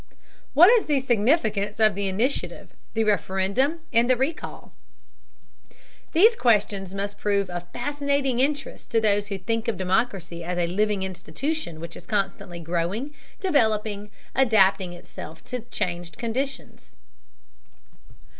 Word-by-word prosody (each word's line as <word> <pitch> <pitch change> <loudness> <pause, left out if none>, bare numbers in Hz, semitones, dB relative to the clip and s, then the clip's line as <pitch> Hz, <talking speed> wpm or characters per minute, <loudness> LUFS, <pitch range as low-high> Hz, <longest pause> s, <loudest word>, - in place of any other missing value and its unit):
What 350 +8 +9
is 475 -3 +4
the 290 -3 +2
significance 220 -4 +1
of 215 -1 +5
the 200 +1 -2
Initiative, 225 +9 -2 0.2
the 225 - +2
Referendum, 205 - +1
and 235 +1 +4
the 255 - +6
Recall? 285 +6 -4 1.4
These 440 +8 +6
questions 200 - +1
must 200 +1 -4
prove 200 -2 0
of 175 0 -6
fascinating 280 0 -1
interest 280 +1 -1
to 230 - +3
those 205 -2 +2
who 200 -1 -3
think 225 +4 -2
of 225 -5 0
democracy 185 -3 -1
as 175 +1 -3
a 175 - +2
living 200 +2 0
institution 185 - -4
which 170 +1 -7
is - - -12
constantly 195 -4 -2
growing, 175 - -2 0.3
developing, 215 - +1 0.2
adapting 195 -7 +3
itself 165 -2 -10
to 250 - -4
changed 175 -1 -3
conditions. 240 - -4
210 Hz, 125 wpm, -25 LUFS, 190-260 Hz, 1.4 s, What